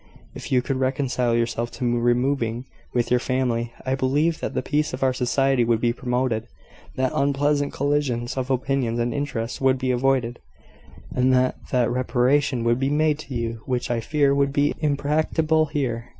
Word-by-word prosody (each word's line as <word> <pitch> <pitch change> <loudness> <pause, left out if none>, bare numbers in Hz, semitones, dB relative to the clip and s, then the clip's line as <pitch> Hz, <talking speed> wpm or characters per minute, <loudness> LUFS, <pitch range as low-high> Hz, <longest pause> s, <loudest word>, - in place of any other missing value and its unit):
If - - -8
you 125 -2 +3
could 135 0 -2
reconcile 130 -2 0
yourself 120 0 -1
to 120 -1 0
removing, 120 0 0 0.3
with 120 -1 -1
your 125 - +4
family, 120 -2 -1
I 130 - 0
believe 145 +5 +1
that - - -4
the - - -1
peace 150 0 0
of 130 - -5
our 130 -1 +3
society 135 0 +1
would 115 -1 +2
be 120 0 +1
promoted, 125 -2 -1 0.5
that 130 0 0
unpleasant 145 +1 +1
collisions 140 -4 -1
of 130 -1 -3
opinions 130 -2 0
and 120 0 -1
interests 130 -5 -3
would 135 0 +3
be 130 0 -1
avoided, 125 -1 0 0.7
and 130 +1 +2
that 130 0 +2
that 125 -2 +1
reparation 125 +1 +1
would 120 +1 +2
be 135 +1 +1
made 150 0 +2
to 135 -4 -7
you 115 -1 -3
which 125 -2 -1
I 120 - 0
fear 140 +4 +2
would 140 0 +2
be 145 +1 +2
impracticable 155 +1 +1
here. 125 -6 -3
130 Hz, 175 wpm, -23 LUFS, 120-140 Hz, 0.7 s, your